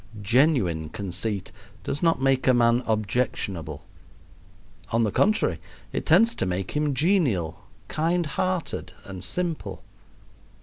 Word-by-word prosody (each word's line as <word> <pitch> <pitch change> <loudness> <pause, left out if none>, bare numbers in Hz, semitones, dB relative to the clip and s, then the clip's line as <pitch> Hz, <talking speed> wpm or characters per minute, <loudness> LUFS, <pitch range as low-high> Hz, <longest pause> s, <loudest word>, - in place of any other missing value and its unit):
Genuine 105 - +2
conceit 100 +2 -4 0.3
does 140 - -3
not 165 -4 +3
make 135 -1 +2
a 130 - +6
man 120 0 +4
objectionable. 105 - -1 1.1
On 115 +1 +2
the 105 - +1
contrary, 215 - +2 0.3
it - - -3
tends 230 +1 +5
to 95 - -2
make 90 +1 -2
him 150 -2 0
genial, 130 - +1 0.2
kind 170 +2 0
hearted, 180 +4 -2
and 95 -2 -7
simple. 175 -3 -3
125 Hz, 120 wpm, -25 LUFS, 95-160 Hz, 1.1 s, a